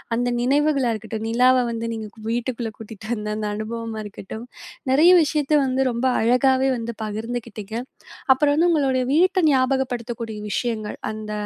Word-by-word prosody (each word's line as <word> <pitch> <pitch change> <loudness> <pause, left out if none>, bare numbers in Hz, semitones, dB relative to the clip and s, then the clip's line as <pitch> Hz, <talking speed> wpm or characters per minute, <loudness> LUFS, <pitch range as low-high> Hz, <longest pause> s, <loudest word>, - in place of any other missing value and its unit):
அந்த 245 +1 0
நினைவுகளா 275 -1 +2
இருக்கட்டும், 220 0 -6
நிலாவ 250 +2 +4 0.2
வந்து 230 0 -3
நீங்க 220 -1 -5 0.2
வீட்டுக்குள்ள 235 -1 -2
கூட்டிட்டு 220 -1 -10
அந்த 210 -1 -6
அந்த 210 -1 -2
அனுபவமா 225 0 -5
இருக்கட்டும் 210 +3 -8 0.5
நிறைய 320 +7 +6
விஷயத்த 300 0 0
வந்து 265 0 +1
ரொம்ப 235 +2 -2 0.2
அழகாவே 260 +3 +3
வந்து 230 -1 -5
பகிர்ந்துக்கிட்டீங்க. 220 -1 -5 0.6
அப்புறம் 285 +2 +2
வந்து 345 +3 +3
உங்களுடைய 265 -5 +2
வீட்ட 370 +5 +3
ஞாபகப்படுத்தக்கூடிய 245 -4 -1
விஷயங்கள், 220 -2 -2
அந்த 215 0 -7
235 Hz, 135 wpm, -22 LUFS, 220-265 Hz, 0.6 s, நிறைய